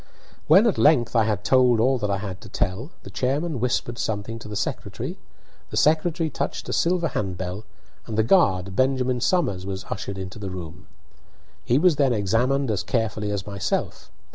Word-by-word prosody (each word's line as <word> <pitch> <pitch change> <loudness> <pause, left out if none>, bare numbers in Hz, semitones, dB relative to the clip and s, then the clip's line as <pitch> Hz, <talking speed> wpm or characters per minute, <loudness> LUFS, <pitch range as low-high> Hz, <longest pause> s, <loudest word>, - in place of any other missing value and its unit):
When 205 - +7
at 225 - +2
length 125 -6 +4
I 115 -2 +4
had 105 -2 -1
told 125 -2 +4
all 130 +3 +3
that 105 -2 -1
I 100 - +1
had 95 -1 -6
to 115 - -11
tell, 100 - -2
the 100 - -10
chairman 140 - -1
whispered 120 0 -1
something 110 +1 -3
to 115 - -10
the 105 - -6
secretary; - - -4 0.5
the - - -5
secretary 160 +2 +2
touched 150 - -4
a - - -3
silver 170 -1 +1
hand 95 -7 -3
bell, 95 +4 -5 0.4
and 110 - -4
the 110 - +4
guard, 95 - +3
Benjamin 130 -1 +1
Somers, 125 - +1
was 95 0 -5
ushered 100 -1 -4
into 95 +2 -7
the 100 -2 -5
room. 90 +1 -8 0.8
He 120 +7 +2
was 165 -1 +4
then 135 -4 +3
examined 120 +5 +1
as 105 - -1
carefully 110 -3 -1
as 100 -2 -3
myself. 100 -1 -3
115 Hz, 185 wpm, -24 LUFS, 100-135 Hz, 0.8 s, When